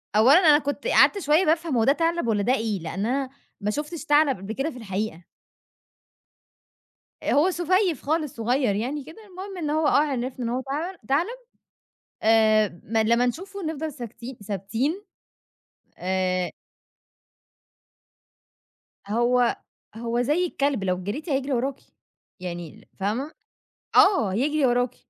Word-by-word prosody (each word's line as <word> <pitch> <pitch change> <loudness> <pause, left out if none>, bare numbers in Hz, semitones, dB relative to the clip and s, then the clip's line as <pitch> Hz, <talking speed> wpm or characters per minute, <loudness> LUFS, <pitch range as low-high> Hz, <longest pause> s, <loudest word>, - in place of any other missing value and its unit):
أولًا 255 +9 +7
أنا 305 -4 +6
كنت 285 - -4
قعدت 410 -4 +5
شوية 315 +2 +3
بافهم 320 -4 +1
هو 225 - +3
ده 275 - +5
تَعلَب 335 -4 0
والّا 210 -2 +1
ده 250 +4 +2
إيه؟ 220 -6 -1
لإن 195 +5 -4
أنا 265 +2 -1 0.3
ما 210 +1 0
شُفتش 305 +4 -5
تَعلَب 295 -5 +4
قبل 195 +4 -6
كده 275 +6 -2
في 255 - -10
الحقيقة. 195 -5 -4 2.0
آآ، - - 0
هو 325 +6 +4
سُفيّف 355 -2 +1
خالص 305 -1 -1
صغيّر 240 -1 +1
يعني 265 +7 -3
كده، 315 +3 -12
المهم 380 +1 -8
إن 305 -4 -3
هو 310 0 +1
آه - - +3
عرفنا 255 -4 -2
إن - - -1
هو 255 +2 -1
تعلم 315 +8 -4
تعلب 345 - 0 0.9
آآ، 215 -4 +4
م 225 +2 -2
لمّا 235 +3 +3
نشوفه 380 - -4
نفضل 315 0 -3
ساكتين 240 -1 -9
ثابتين 230 - -2 0.9
آآ 185 -1 -1 2.6
هو 240 +2 +2 0.4
هو 235 +1 -1
زي 305 +8 +1
الكلب 280 - -1
لو 185 -1 -1
جريتِ 290 - -5
هيجري 275 0 0
وراكِ، 265 +2 -1 0.6
يعني 175 -3 -8
فاهمة، 235 +10 -2 0.7
آه 315 - +5
يجري 290 +4 +1
وراكِ. 245 0 +1
260 Hz, 140 wpm, -25 LUFS, 220-310 Hz, 2.6 s, أولًا